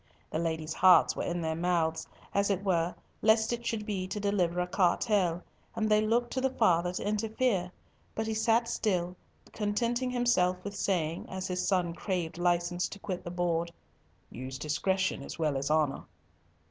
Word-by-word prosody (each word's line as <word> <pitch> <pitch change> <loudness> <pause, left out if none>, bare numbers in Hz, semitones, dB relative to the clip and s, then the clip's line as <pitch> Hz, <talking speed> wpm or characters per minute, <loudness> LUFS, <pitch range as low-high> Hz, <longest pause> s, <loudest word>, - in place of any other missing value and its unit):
The 155 - -1
ladies' 160 -1 -2
hearts 180 -2 +6
were - - -3
in 175 0 -2
their 160 -1 -1
mouths, 165 -1 0 0.3
as 200 0 +2
it 195 -1 0
were, 175 -3 +1 0.3
lest 220 +1 +4
it 235 0 -4
should 220 -3 -2
be 195 -4 -2
to 210 - -4
deliver 185 -4 +1
a 180 - +1
cartel, 180 -1 +1 0.3
and 215 - 0
they 215 0 +4
looked 235 +3 +1
to 260 - -1
the 265 - +2
father 180 -8 +2
to 190 - -3
interfere, 215 -3 0 0.4
but 220 - -1
he 220 - -2
sat 225 +2 +2
still, 180 -6 -1 0.4
contenting 235 +4 0
himself 240 -8 +2
with 205 0 -6
saying, 170 -5 -1
as 190 0 -4
his 180 0 -2
son 180 -3 +1
craved 175 -2 -3
license 175 0 +1
to - - -8
quit 190 -2 -5
the - - -5
board, 170 -1 -1 0.6
"Use 130 +4 -6
discretion 190 +5 0
as - - -7
well 155 -3 0
as 135 +1 -2
honour." 155 -3 +1
185 Hz, 175 wpm, -30 LUFS, 170-215 Hz, 0.6 s, hearts